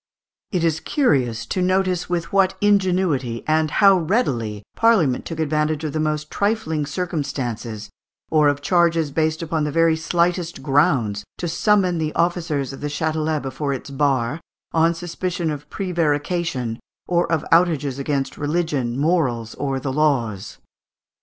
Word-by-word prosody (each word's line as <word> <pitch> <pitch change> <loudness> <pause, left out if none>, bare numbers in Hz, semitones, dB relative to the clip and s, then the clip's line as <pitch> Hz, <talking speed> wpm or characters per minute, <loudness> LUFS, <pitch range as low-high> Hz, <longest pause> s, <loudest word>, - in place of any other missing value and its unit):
] - - -71
It 180 -4 0
is 160 -2 +1
curious 130 - +1
to 185 - -2
notice 185 -1 +1
with 175 0 -2
what 195 -1 +3
ingenuity 185 - +1
and 155 0 +2
how 195 +2 +5
readily 125 - -1
Parliament 195 - +3
took 165 -1 -6
advantage 155 0 0
of 155 - -3
the 155 - -1
most 155 0 -2
trifling 200 -8 -1
circumstances 130 - -4 0.4
or 155 -2 +4
of 145 0 0
charges 170 -3 +2
based 160 +2 0
upon 160 -1 -1
the 150 - -1
very 165 +1 +3
slightest 170 -1 -1
grounds 130 -8 +2
to 175 - -3
summon 180 0 +2
the 155 -1 -2
officers 165 -6 0
of 135 - -10
the 145 - -2
Châtelet 155 +1 -1
before 135 +2 -2
its 135 +1 -7
bar 135 +1 0 0.3
on 165 +1 +3
suspicion 175 -1 -3
of 150 -1 -7
prevarication 160 -8 -1 0.3
or 175 -1 +1
of 160 -3 0
outrages 155 -6 +2
against 140 -1 -2
religion, 145 -6 -1
morals, 135 -8 0
or 135 -1 -2
the 135 0 -3
laws. 125 -10 0
155 Hz, 145 wpm, -21 LUFS, 140-175 Hz, 0.4 s, how